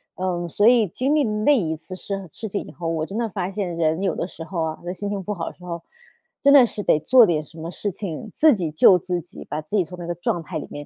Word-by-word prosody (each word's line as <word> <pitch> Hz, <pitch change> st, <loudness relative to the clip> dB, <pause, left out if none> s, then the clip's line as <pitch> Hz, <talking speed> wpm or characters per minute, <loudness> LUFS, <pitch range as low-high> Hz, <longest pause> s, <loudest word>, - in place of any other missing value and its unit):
嗯， 180 Hz, -2 st, -2 dB
所 205 Hz, +6 st, +1 dB
以 235 Hz, -4 st, +5 dB
经 260 Hz, -, -1 dB
历 300 Hz, -, +3 dB
那 215 Hz, +6 st, +3 dB
一 160 Hz, -6 st, -1 dB
次 185 Hz, -, -9 dB
生 195 Hz, 0 st, -5 dB
事 225 Hz, -, -6 dB
情 200 Hz, -, -3 dB
以 -, -, -11 dB
后， 170 Hz, -2 st, -6 dB
我 160 Hz, -1 st, -1 dB
真 200 Hz, +5 st, -6 dB
的 235 Hz, -1 st, 0 dB
发 185 Hz, 0 st, -3 dB
现 190 Hz, -4 st, -3 dB
人 160 Hz, +2 st, +1 dB
有 190 Hz, -3 st, 0 dB
的 -, -, -2 dB
时 165 Hz, -, -9 dB
候 170 Hz, -3 st, -2 dB
啊， 160 Hz, 0 st, -3 dB
就 175 Hz, -, -12 dB
是 180 Hz, -, -2 dB
心 200 Hz, +2 st, -5 dB
情 200 Hz, -1 st, -3 dB
不 210 Hz, -, -3 dB
好 170 Hz, -4 st, -4 dB
的 -, -, -13 dB
时 180 Hz, -, -17 dB
候， 170 Hz, -1 st, -5 dB, 0.6 s
真 280 Hz, 0 st, +6 dB
的 265 Hz, -4 st, +9 dB
是 210 Hz, -, -5 dB
得 155 Hz, -, +3 dB
做 250 Hz, +3 st, +7 dB
点 160 Hz, -5 st, 0 dB
什 165 Hz, -, -17 dB
么 165 Hz, -, -5 dB
事 200 Hz, +3 st, -3 dB
情， 195 Hz, +2 st, -6 dB
自 310 Hz, -3 st, +5 dB
己 170 Hz, -5 st, -3 dB
救 180 Hz, +4 st, +6 dB
自 180 Hz, 0 st, -2 dB
己， 175 Hz, -, -12 dB
把 155 Hz, +1 st, -3 dB
自 155 Hz, +7 st, -5 dB
己 195 Hz, -, +4 dB
从 180 Hz, +2 st, -10 dB
那 170 Hz, -, -6 dB
个 175 Hz, -, -2 dB
状 175 Hz, 0 st, -1 dB
态 165 Hz, 0 st, -5 dB
里 -, -, -6 dB
面 145 Hz, 0 st, -7 dB
180 Hz, 320 characters per minute, -23 LUFS, 165-210 Hz, 0.6 s, 的